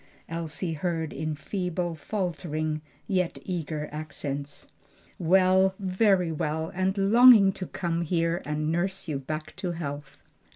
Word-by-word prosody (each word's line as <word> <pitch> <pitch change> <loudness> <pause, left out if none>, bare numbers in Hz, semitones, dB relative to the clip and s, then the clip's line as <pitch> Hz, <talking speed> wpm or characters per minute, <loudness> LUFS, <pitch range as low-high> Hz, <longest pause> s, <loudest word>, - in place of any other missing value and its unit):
Elsie 165 +1 -3
heard 160 -1 -2
in 155 +1 -3
feeble, 180 +1 -2
faltering, 155 -4 -3 0.2
yet 185 -4 0
eager 160 -4 -3
accents. 145 -2 -5 0.5
"Well, 190 +2 +4
very 190 -2 +2
well, 160 +1 -2
and 190 +1 0
longing 215 0 +7
to 185 -1 -6
come 170 -1 -2
here 170 +1 0
and 150 +1 -1
nurse 190 +3 -1
you 145 -3 -2
back 155 +3 -5
to 180 -2 -2
health." 145 -3 -6
170 Hz, 125 wpm, -27 LUFS, 155-185 Hz, 0.5 s, longing